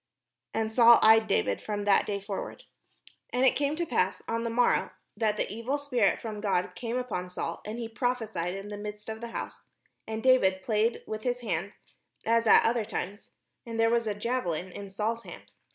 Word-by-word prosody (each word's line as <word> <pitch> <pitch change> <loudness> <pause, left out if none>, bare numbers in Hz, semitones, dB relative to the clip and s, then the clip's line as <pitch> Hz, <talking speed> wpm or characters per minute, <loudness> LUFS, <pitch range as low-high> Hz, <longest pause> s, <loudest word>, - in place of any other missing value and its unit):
And 220 0 -1
Saul 235 0 +8
eyed 220 0 +6
David 100 - +1
from 205 -1 -3
that 200 -1 +4
day 200 -1 -1
forward. 200 0 -6 0.7
And 250 +1 +1
it 260 - +4
came 285 +1 0
to 340 +2 -1
pass 220 - 0
on 230 0 -1
the 230 - -1
morrow, 240 +1 +2 0.3
that 215 -1 0
the - - 0
evil 235 +6 -2
spirit 285 -4 +1
from 215 -2 -6
God 185 -3 0
came 235 +5 -3
upon 210 -8 -3
Saul, 170 -2 -4
and 215 +2 -4
he 235 -1 -4
prophesied 225 -7 -2
in 195 +1 -7
the 205 - -6
midst 210 +1 -7
of 220 +1 -6
the 235 - -4
house: 230 - -7 0.4
and 220 0 -4
David 190 -8 +4
played 220 +1 +1
with 215 0 -5
his 245 +1 -1
hand, 195 -3 -2 0.5
as 230 0 +2
at - - +7
other 230 0 +2
times: 205 -1 -6 0.3
and 230 -1 -6
there 225 0 +4
was 235 -1 +1
a 210 - -1
JaveUn 200 -6 -2
in 200 +2 -8
Saul's 220 +4 -2
hand. - - -12
220 Hz, 200 wpm, -28 LUFS, 205-235 Hz, 0.7 s, Saul